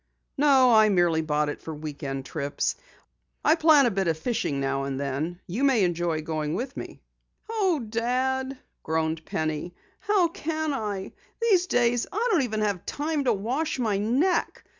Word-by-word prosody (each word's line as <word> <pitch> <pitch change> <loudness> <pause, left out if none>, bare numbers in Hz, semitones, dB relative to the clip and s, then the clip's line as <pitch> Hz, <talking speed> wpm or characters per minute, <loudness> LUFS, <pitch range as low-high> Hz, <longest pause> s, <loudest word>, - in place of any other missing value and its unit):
"No, 270 -4 +5
I 215 -1 +6
merely 175 -4 +3
bought 150 -1 0
it - - -6
for 160 - -6
week 150 -1 -7
end 135 -1 -4
trips. 145 -1 -2 0.7
I 310 - +6
plan 315 -3 +6
on - - +4
a 240 - +2
bit 190 -1 -1
of 160 -1 +1
fishing 160 - -1
now 135 0 -1
and 135 -1 -3
then. 140 +6 -3
You 210 +10 -3
may 260 -7 +4
enjoy 170 -3 0
going 155 0 -2
with 255 +6 -4
me." - - -8 0.4
"Oh, 395 -8 +1
Dad," 260 +4 -1 0.2
groaned 160 0 -1
Penny, 155 +2 -3 0.2
"how 400 -5 +2
can 315 -2 -2
I? 205 -6 -3 0.3
These 395 -6 +3
days 240 -3 +2
I 460 +5 0
don't 350 -8 +4
even 220 -4 -2
have 200 -4 -1
time 295 -1 -2
to 240 - +4
wash 255 +11 -2
my 215 -6 0
neck. 260 - +1
215 Hz, 175 wpm, -26 LUFS, -, 0.7 s, I